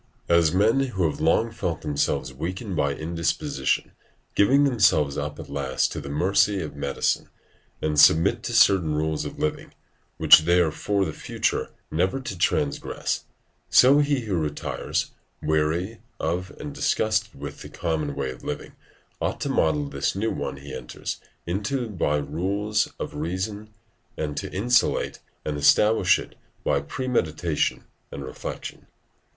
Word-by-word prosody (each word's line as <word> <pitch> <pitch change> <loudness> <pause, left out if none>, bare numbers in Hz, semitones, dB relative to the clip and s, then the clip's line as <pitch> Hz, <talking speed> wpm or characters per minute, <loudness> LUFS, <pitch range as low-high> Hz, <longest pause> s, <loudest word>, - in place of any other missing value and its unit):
As 85 -2 +5
men 105 +8 +3
who 125 -9 -1
have 75 - -4
long 95 +9 +3
felt 85 -7 -3
themselves 70 -3 -1
weakened 95 - -4
by 70 -2 +1
indisposition, 80 -4 -1 0.4
give 100 - +4
themselves 110 - +4
up 75 +1 -4
at - - -8
last 70 -2 -1
to - - -4
the 70 - -7
mercy 95 +6 +2
of 75 -5 -5
medicine 70 -1 -1 0.5
and 75 -1 +1
submit 85 +10 +6
to 120 - -3
certain 95 -9 +5
rules 80 0 -1
of - - -6
living, 75 - -3 0.4
which - - +9
they 85 +3 +3
are 85 -3 +3
for 100 +5 0
the 80 - -4
future - - -1 0.2
never 95 +10 +1
to 130 -7 -5
transgress; 75 -4 -1 0.4
so 135 +3 +7
he 145 -2 +2
who 105 -5 -2
retires, 75 -2 -2 0.3
weary 80 +7 0 0.2
of 90 +4 -2
and 150 -1 -6
disgusted 110 - 0
with 70 - -7
the - - -9
common 80 -4 -2
way 70 -2 -2
of 60 - -12
living, - - -5 0.5
ought - - -1
to - - -1
model 75 -2 +1
this 70 +3 -1
new 110 +3 0
one - - -4
he 70 +1 -9
enters - - -5 0.3
into 105 +8 -2
by 85 -8 0
the 75 - -2
rules 100 +8 0
of - - -4
reason, 95 +7 -3 0.5
and 75 -1 -3
to 95 +4 -4
institute 120 +6 +1 0.3
and 75 -1 -2
establish 105 +9 +5
it - - -8 0.3
by 70 - +1
premeditation 85 - -1 0.3
and 70 - -6
reflection. - - -7
85 Hz, 150 wpm, -25 LUFS, 75-105 Hz, 0.5 s, which